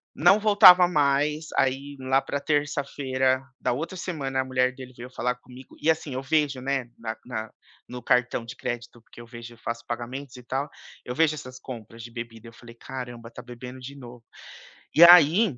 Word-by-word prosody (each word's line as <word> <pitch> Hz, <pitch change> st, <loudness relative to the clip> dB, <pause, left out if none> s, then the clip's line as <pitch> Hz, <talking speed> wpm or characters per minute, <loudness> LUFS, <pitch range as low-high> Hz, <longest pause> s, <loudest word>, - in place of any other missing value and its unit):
Não 175 Hz, +7 st, +5 dB
voltava 185 Hz, -4 st, +8 dB
mais. 150 Hz, 0 st, +1 dB
Aí, 135 Hz, +2 st, 0 dB
lá 130 Hz, +1 st, +1 dB
pra 140 Hz, -, -4 dB
terça-feira 140 Hz, -3 st, 0 dB, 0.2 s
da 125 Hz, -, 0 dB
outra 165 Hz, +7 st, -5 dB
semana, 135 Hz, -7 st, -3 dB
a -, -, -5 dB
mulher 130 Hz, -1 st, +1 dB
dele 130 Hz, -1 st, -11 dB
veio 120 Hz, +1 st, -9 dB
falar 125 Hz, 0 st, -2 dB
comigo 125 Hz, +1 st, -15 dB
e 155 Hz, -, +1 dB
assim 160 Hz, -3 st, 0 dB
eu 130 Hz, -, -3 dB
vejo, 140 Hz, -1 st, 0 dB
né, 135 Hz, -2 st, -2 dB
na 110 Hz, -1 st, -5 dB
na 110 Hz, -3 st, -5 dB, 0.4 s
no 125 Hz, -1 st, -8 dB
cartão 125 Hz, -1 st, +1 dB
de 115 Hz, -, -9 dB
crédito, 120 Hz, 0 st, -6 dB
porque 120 Hz, -, -15 dB
eu -, -, -11 dB
vejo 120 Hz, 0 st, -10 dB
eu -, -, -18 dB
faço 115 Hz, +1 st, -6 dB
pagamentos 125 Hz, +3 st, -6 dB
e 125 Hz, -, -12 dB
tal. 135 Hz, +4 st, -3 dB, 0.4 s
Eu 125 Hz, -, -5 dB
vejo 160 Hz, 0 st, +3 dB
essas 130 Hz, -2 st, -9 dB
compras 115 Hz, -2 st, -10 dB
de 120 Hz, -, -10 dB
bebida. 115 Hz, -1 st, -8 dB
Eu 115 Hz, -, -13 dB
falei: 115 Hz, 0 st, -14 dB
"Caramba, 120 Hz, -2 st, -8 dB
tá -, -, -10 dB
bebendo 125 Hz, +1 st, -10 dB
de 135 Hz, +2 st, -9 dB
novo". 120 Hz, -3 st, -12 dB, 0.7 s
E 165 Hz, -, +8 dB
aí, 175 Hz, -, +7 dB
130 Hz, 195 wpm, -25 LUFS, 120-145 Hz, 0.7 s, voltava